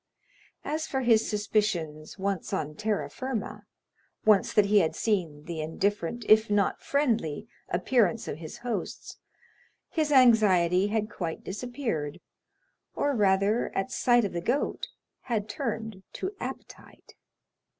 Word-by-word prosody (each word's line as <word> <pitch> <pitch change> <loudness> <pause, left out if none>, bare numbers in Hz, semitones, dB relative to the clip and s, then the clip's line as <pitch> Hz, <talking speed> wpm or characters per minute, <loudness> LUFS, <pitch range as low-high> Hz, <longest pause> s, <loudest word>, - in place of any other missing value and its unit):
As 310 +2 -2
for 265 - -1
his 225 -3 +3
suspicions, 200 -8 -1
once 195 -2 -2
on 150 -1 -2
terra 210 +6 -1
firma, 255 -5 -5 0.6
once 210 -3 +4
that 210 - +4
he 205 +1 +5
had 160 -4 +1
seen 170 -9 -1
the 165 -1 -5
indifferent, 200 +7 -2
if 220 +1 +6
not 205 -1 +1
friendly, 230 - 0 0.2
appearance 225 +4 +1
of 150 - -5
his 160 -2 -8
hosts, 240 -2 -4 0.7
his 310 -2 0
anxiety 205 -8 +5
had 215 0 0
quite 165 -3 -4
disappeared, 210 - -4 0.8
or 285 -1 +1
rather, 200 +1 +2
at 195 +7 -1
sight 240 -3 +3
of 200 - -4
the 170 - -2
goat, 245 +10 -1 0.4
had 220 -4 -1
turned 225 -6 -4
to 375 - -3
appetite. - - -9
210 Hz, 130 wpm, -28 LUFS, 180-235 Hz, 0.8 s, if